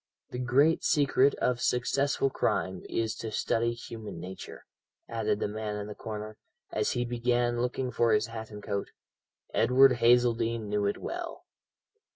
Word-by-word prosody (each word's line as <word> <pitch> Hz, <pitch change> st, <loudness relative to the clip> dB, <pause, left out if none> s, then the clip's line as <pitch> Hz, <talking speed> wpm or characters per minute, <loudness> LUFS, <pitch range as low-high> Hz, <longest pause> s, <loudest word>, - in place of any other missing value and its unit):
The 125 Hz, -, -4 dB
great 135 Hz, +6 st, +3 dB
secret 140 Hz, -1 st, +3 dB
of 125 Hz, -1 st, 0 dB
successful 135 Hz, +2 st, +1 dB
crime 95 Hz, -7 st, -1 dB
is 110 Hz, -2 st, -1 dB
to 115 Hz, -, -4 dB
study 115 Hz, +2 st, 0 dB
human 110 Hz, -6 st, -8 dB
nature," 95 Hz, +2 st, -9 dB, 0.4 s
added 110 Hz, -2 st, -1 dB
the -, -, 0 dB
man 105 Hz, 0 st, -4 dB
in 105 Hz, -1 st, -4 dB
the 105 Hz, -, -7 dB
corner, 105 Hz, 0 st, -7 dB, 0.3 s
as -, -, 0 dB
he 120 Hz, 0 st, -1 dB
began 120 Hz, 0 st, 0 dB
looking 125 Hz, +1 st, -1 dB
for 115 Hz, -1 st, +2 dB
his 105 Hz, 0 st, +3 dB
hat 110 Hz, -1 st, -7 dB
and 105 Hz, -1 st, -9 dB
coat. 100 Hz, -2 st, -3 dB, 0.6 s
"Edward 130 Hz, 0 st, +5 dB
Hazeldene 115 Hz, -2 st, +3 dB
knew 105 Hz, 0 st, 0 dB
it 100 Hz, -, -1 dB
well." -, -, -6 dB
115 Hz, 155 wpm, -29 LUFS, 105-125 Hz, 0.6 s, Edward